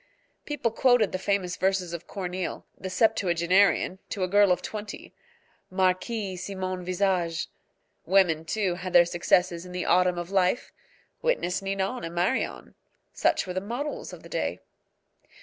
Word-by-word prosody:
People 280 -6 -1
quoted 245 -2 +3
the 185 - -3
famous 190 -2 -1
verses 190 -2 0
of 170 -1 -6
Corneille, 185 -2 -4
the 190 - -6
septuagenarian, 185 -2 +2
to 195 - -2
a - - +1
girl 200 0 +5
of 180 0 +1
twenty 210 -1 -7 0.6
"Marquise, 185 +1 0
si 200 - -6
mon 185 -1 -3
visage." 180 -2 0 0.6
Women, 175 -4 +4
too, 190 +2 0
had 180 +1 -6
their 175 - +8
successes 175 0 +1
in 180 0 -10
the 180 - -3
autumn 180 0 +3
of 175 +1 -5
life. 190 +4 +1 0.5
Witness 485 - 0
Ninon 195 +5 -2
and 165 +1 -6
Marion. 180 +9 -1 0.4
Such - - +1
were 180 - -5
the 185 - -2
models 245 +9 -4
of - - -11
the - - -12
day. - - -2
185 Hz, 150 wpm, -27 LUFS, 180-200 Hz, 0.6 s, their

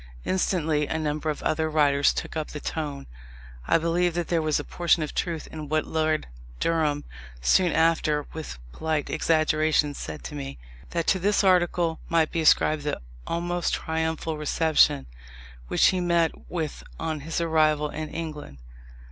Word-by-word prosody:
Instantly 160 -5 +1
a - - -2
number 155 0 -2
of 150 - -3
other 160 0 0
writers 145 -2 +3
took - - -5
up 155 -1 -2
the 150 - -7
tone: 145 -3 -4 0.6
I - - +5
believe 170 +1 +1
there 170 -1 0
was 155 -2 +1
a - - -4
portion 170 0 +1
of 150 - -5
truth 165 -3 -2
in 155 -2 -7
what 155 0 +1
Lord 155 -1 0 0.3
Durham, 150 -3 +1 0.4
soon 175 - +3
after, 155 -2 +2
with 160 - -6
polite 155 - -2
exaggeration, 155 -2 +2
said 75 - -7
to - - -7
me 70 -2 -6 0.3
that 170 -1 -1
to 190 - +2
this 205 +3 +2
article 175 -3 +2
might 165 -2 +2
be 165 - 0
ascribed 155 -1 +4
the 145 0 -2 0.3
almost 175 +1 -1
triumphal 160 -1 -2
reception 150 - +3 0.6
which - - +4
he 185 - 0
met 170 -2 +2 0.2
with 160 -4 -4 0.2
on 160 -1 -2
his 160 +4 -3
arrival 155 -2 +2
in 155 0 -5
England. 155 - -6
155 Hz, 155 wpm, -26 LUFS, 150-165 Hz, 0.6 s, I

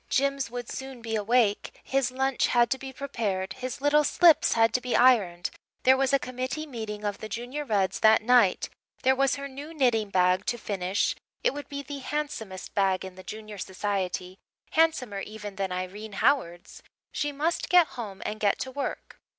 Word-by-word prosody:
Jims 275 -1 +1
would 245 0 -6
soon 265 -3 -7
be 225 -1 -2
awake 215 0 +1
his 270 -2 +1
lunch 265 +1 +1
had 240 -1 +3
to 265 - 0
be 265 0 -7
prepared 220 -9 -3
his 255 0 -6
little 295 +1 +4
slips 330 +2 +5
had 225 -1 +3
to 250 - +1
be 250 -1 -1
ironed 200 -9 +4 0.3
there 260 +1 +6
was 270 0 +1
a 275 - +5
committee 255 +4 -4
meeting 220 -6 -6
of 205 -1 -2
the 215 - -7
Junior 245 +7 -4
Reds 200 -7 0
that 220 0 +5
night 235 -5 +4 0.4
there 265 +1 +4
was 275 0 +2
her 280 0 -5
new 285 +4 -9
knitting 235 -7 +2
bag 185 -1 +3
to 240 - 0
finish 195 -3 -1 0.3
it - - +3
would 290 0 -7
be 280 0 -5
the 280 +1 -6
handsomest 260 -10 -4
bag 190 -1 +1
in 190 - -8
the 185 - -11
Junior 215 +1 -8
Society 185 -1 -3 0.3
handsomer 270 -11 +2
even 210 -1 -7
than 195 -1 -2
Irene 190 +4 -5
Howard's 175 -8 0 0.3
she 295 -1 -1
must 310 +4 -1
get 355 -3 +6
home 205 -5 -7
and 215 0 -3
get 205 -2 +2
to 260 - -4
work. 280 +1 -5
235 Hz, 185 wpm, -27 LUFS, 200-270 Hz, 0.4 s, there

